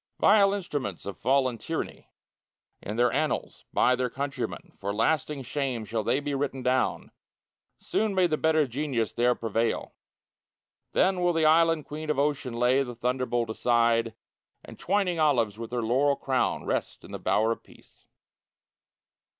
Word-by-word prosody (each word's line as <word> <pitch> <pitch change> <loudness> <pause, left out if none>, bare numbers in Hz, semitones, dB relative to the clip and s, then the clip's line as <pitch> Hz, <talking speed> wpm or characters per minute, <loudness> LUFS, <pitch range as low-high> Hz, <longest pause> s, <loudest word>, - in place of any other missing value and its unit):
Vile 200 -1 +5
instruments 145 - -4
of 100 - -5
fallen 130 -3 +1
Tyranny - - -5 0.7
In 105 - -5
their 120 +1 +3
own - - -3
annals, 155 +1 -2
by 125 - +3
their 125 0 -1
countrymen. 140 +3 -5
For 100 - -3
lasting 135 +6 0
shame 130 -3 -3
shall 110 0 -2
they 130 - +1
be 145 0 -3
written 135 -2 -2
down. 125 0 0 0.7
Soon 215 -2 -1
may 185 -1 +4
the 160 -3 +1
better 155 -1 +2
Genius 130 -3 -2
there 120 +1 +2
prevail! 115 0 -1 1.0
Then 185 -1 +2
will 175 0 +2
the 165 -1 +2
Island 165 0 +4
Queen 155 +1 -7
of 150 - +1
Ocean 140 -4 -1
lay 125 +3 +3
The 125 -3 -4
thunderbolt 120 -1 -1
aside, 115 -1 +2 0.5
And, - - -12
twining 185 -3 0
olives 120 -9 +2
with 115 0 -6
her 120 -1 -1
laurel 135 +5 +2
crown, 130 -2 -1
Rest - - -3
in - - -12
the - - -5
Bower 110 +2 +2
of 115 - -3
Peace. - - -21
130 Hz, 160 wpm, -27 LUFS, 115-150 Hz, 1.0 s, Vile